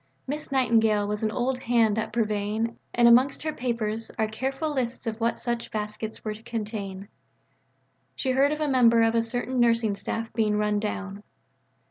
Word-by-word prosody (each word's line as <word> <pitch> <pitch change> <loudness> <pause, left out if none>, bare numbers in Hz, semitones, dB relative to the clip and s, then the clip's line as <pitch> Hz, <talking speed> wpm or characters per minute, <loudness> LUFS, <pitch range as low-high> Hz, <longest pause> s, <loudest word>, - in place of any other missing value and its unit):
Miss 295 +2 -5
Nightingale 225 -5 +3
was 210 0 -2
an 220 - +1
old 250 +3 -1
hand 230 -3 +2
at - - -3
purveying, 215 0 -1
and 240 0 +4
amongst 255 +5 +5
her 310 -1 -2
papers 225 -3 -2
are 220 - +1
careful 270 +7 -3
lists 255 -3 -3
of 225 0 -4
what 230 +1 +1
such 240 -1 -3
baskets 215 +1 -5
were 215 - -1
to 215 - -12
contain. 210 -4 -5 1.1
She 260 - -1
heard 275 +3 +3
of 305 0 -3
a 305 - +1
member 235 -4 +5
of 225 0 +3
a 230 - +3
certain 245 +2 -2
nursing 230 -3 +3
staff 225 +2 -4
being 215 -2 +1
run 210 0 +1
down. 200 -1 -4
230 Hz, 175 wpm, -26 LUFS, 215-245 Hz, 1.1 s, amongst